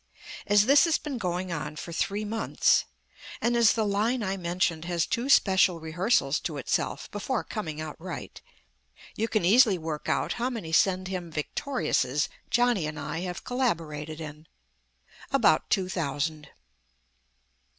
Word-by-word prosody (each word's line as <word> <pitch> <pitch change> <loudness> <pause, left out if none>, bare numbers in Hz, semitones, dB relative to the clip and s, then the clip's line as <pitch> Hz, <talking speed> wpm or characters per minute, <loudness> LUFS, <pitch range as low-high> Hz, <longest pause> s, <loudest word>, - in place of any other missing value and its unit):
As 205 0 +5
this 280 +6 +6
has 330 -2 +2
been 280 -5 -5
going 180 -2 -2
on 150 -2 -4
for 170 - -7
three 205 +5 -1
months, 220 +1 +2 0.5
and 240 0 +1
as 235 -2 +5
the 220 -2 0
line 215 +4 0
I 190 -1 -1
mentioned 170 -2 -1
has 170 -2 0
two 245 +4 -2
special 190 -8 +4
rehearsals 160 - +1
to 155 -4 -4
itself 135 - -2
before 220 +4 -2
coming 160 -9 -5
out 155 +1 -7
right, 180 -3 -7 0.7
you 225 - -1
can 215 -6 0
easily 215 0 +6
work 160 -2 -5
out - - 0
how 250 - +1
many 215 -10 -6
send 185 +2 +3
him 180 -3 -5
victoriouses 150 - -1 0.2
Johnny 240 -9 +2
and 155 0 -6
I 150 +2 -4
have 180 0 -5
collaborated 160 - -2
in. 155 0 -9 0.8
About - - +3
two 185 -1 +1
thousand. 150 -3 -3
180 Hz, 150 wpm, -27 LUFS, 160-220 Hz, 0.8 s, this